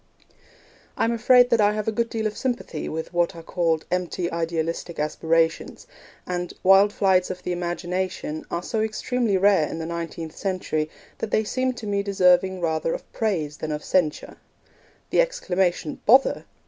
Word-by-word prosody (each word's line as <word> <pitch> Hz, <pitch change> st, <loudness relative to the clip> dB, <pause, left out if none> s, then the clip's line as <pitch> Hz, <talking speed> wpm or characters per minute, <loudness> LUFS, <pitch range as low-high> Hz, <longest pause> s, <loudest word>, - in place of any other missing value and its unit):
I -, -, +1 dB
am 230 Hz, -, +2 dB
afraid 245 Hz, +2 st, +5 dB
that 230 Hz, -2 st, +4 dB
I 205 Hz, 0 st, +4 dB
have 215 Hz, 0 st, -3 dB
a -, -, +2 dB
good 230 Hz, +2 st, -1 dB
deal 225 Hz, -1 st, -3 dB
of 215 Hz, -1 st, -1 dB
sympathy 240 Hz, -11 st, -3 dB
with 160 Hz, +2 st, -5 dB
what 175 Hz, 0 st, +1 dB
are 165 Hz, -, -9 dB
called 165 Hz, -2 st, 0 dB
'empty 180 Hz, -1 st, -1 dB
idealistic 165 Hz, 0 st, -3 dB
aspirations'; 160 Hz, +2 st, 0 dB, 0.4 s
and 180 Hz, -1 st, -3 dB
'wild 195 Hz, +2 st, +6 dB
flights 190 Hz, -3 st, +2 dB
of 180 Hz, 0 st, -6 dB
the 180 Hz, -, -3 dB
imagination' 175 Hz, -2 st, -3 dB
are 170 Hz, -, -3 dB
so 220 Hz, +3 st, -1 dB
extremely 220 Hz, 0 st, 0 dB
rare 190 Hz, -5 st, +3 dB
in -, -, -5 dB
the 165 Hz, -, -4 dB
nineteenth 165 Hz, -1 st, -5 dB
century 180 Hz, -5 st, -2 dB, 0.3 s
that 220 Hz, -, -3 dB
they 215 Hz, -, +2 dB
seem 255 Hz, +4 st, -1 dB
to 240 Hz, -3 st, -9 dB
me 200 Hz, -1 st, 0 dB
deserving 190 Hz, -1 st, +3 dB
rather 160 Hz, 0 st, 0 dB
of -, -, -11 dB
praise 160 Hz, -9 st, -1 dB
than 155 Hz, -, -4 dB
of 150 Hz, 0 st, -4 dB
censure. 165 Hz, -5 st, 0 dB, 0.7 s
The -, -, +5 dB
exclamation 185 Hz, -, -1 dB
'Bother!' 260 Hz, +5 st, +5 dB
180 Hz, 170 wpm, -24 LUFS, 165-215 Hz, 0.7 s, wild